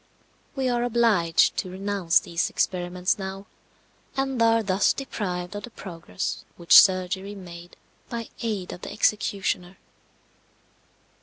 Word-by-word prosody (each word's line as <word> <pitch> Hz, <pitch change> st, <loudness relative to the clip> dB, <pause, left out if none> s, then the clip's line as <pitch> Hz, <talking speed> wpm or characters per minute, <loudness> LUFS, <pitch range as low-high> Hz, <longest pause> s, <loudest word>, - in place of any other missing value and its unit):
We 265 Hz, -2 st, 0 dB
are 240 Hz, -1 st, +1 dB
obliged 225 Hz, -9 st, +3 dB
to 185 Hz, -, -2 dB
renounce 190 Hz, -2 st, +1 dB
these 170 Hz, 0 st, -2 dB
experiments 180 Hz, +2 st, -1 dB
now, 195 Hz, +1 st, -6 dB, 0.7 s
and 270 Hz, -3 st, -1 dB
are 230 Hz, 0 st, +4 dB
thus 195 Hz, 0 st, +2 dB
deprived 180 Hz, -9 st, -4 dB
of 205 Hz, -, -4 dB
the 245 Hz, -, -8 dB
progress 165 Hz, -, -6 dB
which 170 Hz, -, +9 dB
surgery 190 Hz, +1 st, 0 dB
made 175 Hz, -2 st, -11 dB, 0.3 s
by 230 Hz, -2 st, -5 dB
aid 210 Hz, -6 st, -3 dB
of 175 Hz, -, -10 dB
the -, -, -7 dB
executioner. 195 Hz, -3 st, 0 dB
195 Hz, 125 wpm, -25 LUFS, 180-225 Hz, 0.7 s, which